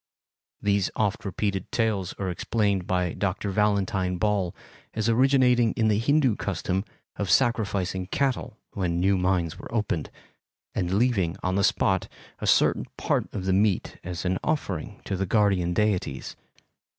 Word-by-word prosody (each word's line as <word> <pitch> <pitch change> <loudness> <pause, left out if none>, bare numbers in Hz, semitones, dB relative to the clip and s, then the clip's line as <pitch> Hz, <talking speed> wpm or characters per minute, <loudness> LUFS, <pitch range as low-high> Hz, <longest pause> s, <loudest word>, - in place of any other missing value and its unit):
These 100 -2 +1
oft 105 0 0
repeated 100 -1 -2
tales 105 -6 0
are 95 -2 -3
explained 100 0 0
by 90 -2 0
Dr. 100 0 -2
Valentine 95 -3 +1
Ball 100 -2 0 0.4
as 110 0 0
originating 125 -1 +4
in 110 -1 +2
the 105 0 +2
Hindu 135 -2 +2
custom 95 0 -2 0.3
of 100 -3 -2
sacrificing 100 -7 +1
cattle 130 -1 -1
when 85 -3 -1
new 95 +2 +3
mines 90 -3 0
were - - -9
opened, 105 -9 -1 0.6
and 90 -1 -1
leaving 100 -7 +1
on 90 - 0
the 100 +1 +1
spot - - +2 0.3
a - - -3
certain - - +3
part - - -1
of 95 -3 -4
the 95 - +2
meat 100 0 +1
as 90 +1 -5
an 90 0 0
offering 105 - -2
to 100 - -2
the 95 +1 -2
guardian 100 -4 +2
deities. 90 -9 -1
100 Hz, 150 wpm, -26 LUFS, 90-110 Hz, 0.6 s, originating